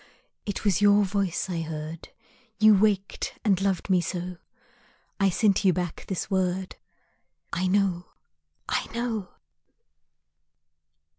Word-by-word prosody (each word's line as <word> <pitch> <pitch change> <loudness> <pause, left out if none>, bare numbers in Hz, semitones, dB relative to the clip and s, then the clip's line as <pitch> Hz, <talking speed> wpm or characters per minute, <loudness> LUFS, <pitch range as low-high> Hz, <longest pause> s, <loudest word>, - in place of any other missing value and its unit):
It 205 +1 -4
was 195 -2 +2
your 205 0 +5
voice 195 -2 -1
I 175 -3 -2
heard, 155 0 -6 0.5
You 215 0 +7
waked 200 -1 +1
and 195 -3 +3
loved 195 -3 0
me 185 -3 +3
so 180 +1 -4 0.8
I 195 -1 +4
send 200 +2 +2
you 190 -2 +5
back 175 -2 -4
this 190 - -3
word, 185 -1 -1 0.8
I 185 +1 0
know, 185 -2 +1 0.6
I - - -1
know! 225 -6 -2
190 Hz, 120 wpm, -26 LUFS, 180-200 Hz, 0.8 s, You